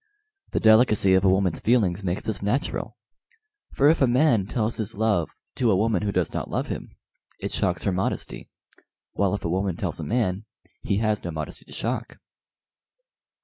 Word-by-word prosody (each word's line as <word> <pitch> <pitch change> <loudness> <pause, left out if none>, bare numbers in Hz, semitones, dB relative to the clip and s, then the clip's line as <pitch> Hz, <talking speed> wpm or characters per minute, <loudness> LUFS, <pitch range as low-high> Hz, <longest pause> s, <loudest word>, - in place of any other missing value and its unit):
The - - -1
delicacy 110 -3 +5
of 95 0 +4
a 95 - +5
woman's 95 -3 +1
feelings 105 -5 +1
makes 90 0 -2
this 110 -5 -3
natural, 110 +8 -2 0.8
for 140 - +4
if 160 +1 +4
a 135 - +5
man 120 -5 +3
tells 110 0 -1
his 110 0 -4
love 105 -6 +1 0.3
to 120 - +2
a 100 - +4
woman 105 -1 +1
who 105 -1 -1
does 90 -4 -1
not - - -3
love - - -2
him, - - -6 0.4
it - - -4
shocks 90 -1 0
her 100 - +1
modesty; 95 +1 -3 0.6
while 100 -1 +1
if 100 - -7
a - - 0
woman 95 +1 -1
tells - - -4
a - - -4
man, 105 -4 -1 0.4
he 100 - -1
has 110 -1 0
no 85 - -4
modesty 80 -3 -6
to - - -17
shock." 115 0 -3
105 Hz, 185 wpm, -25 LUFS, 95-115 Hz, 0.8 s, delicacy